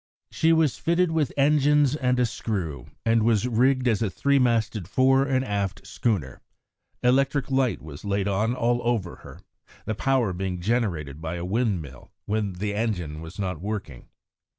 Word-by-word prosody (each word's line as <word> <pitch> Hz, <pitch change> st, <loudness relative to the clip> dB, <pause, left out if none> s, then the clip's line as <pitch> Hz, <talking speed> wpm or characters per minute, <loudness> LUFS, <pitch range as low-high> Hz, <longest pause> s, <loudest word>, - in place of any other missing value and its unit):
She 160 Hz, -, +2 dB
was 160 Hz, -4 st, +2 dB
fitted 170 Hz, +1 st, +1 dB
with 155 Hz, -5 st, 0 dB
engines 145 Hz, 0 st, +4 dB
and 125 Hz, -3 st, +1 dB
a 125 Hz, -, +4 dB
screw, 90 Hz, -, -4 dB, 0.2 s
and 115 Hz, 0 st, +3 dB
was 115 Hz, +1 st, +2 dB
rigged 130 Hz, +2 st, +2 dB
as 115 Hz, -2 st, +2 dB
a 110 Hz, -, +1 dB
three 140 Hz, +8 st, +2 dB
masted 115 Hz, -6 st, +1 dB
fore 135 Hz, +5 st, +3 dB
and 130 Hz, -1 st, +1 dB
aft 100 Hz, -4 st, -3 dB
schooner. 90 Hz, -, -2 dB, 0.6 s
Electric 135 Hz, +2 st, +2 dB
light 130 Hz, -, +1 dB
was 75 Hz, -2 st, -10 dB
laid 100 Hz, -1 st, -1 dB
on 105 Hz, +5 st, 0 dB
all 120 Hz, 0 st, +1 dB
over 115 Hz, -7 st, -1 dB
her, -, -, -13 dB, 0.4 s
the 110 Hz, -, -1 dB
power 120 Hz, -3 st, +1 dB
being 90 Hz, 0 st, -3 dB
generated 85 Hz, -, -1 dB
by 80 Hz, +1 st, -4 dB
a 85 Hz, 0 st, -4 dB
windmill 90 Hz, -, -2 dB
when 105 Hz, -2 st, -1 dB
the 100 Hz, +3 st, -3 dB
engine 90 Hz, -9 st, -2 dB
was 80 Hz, +3 st, -10 dB
not 90 Hz, -5 st, -3 dB
working. 95 Hz, -, -5 dB
110 Hz, 165 wpm, -25 LUFS, 95-130 Hz, 0.6 s, engines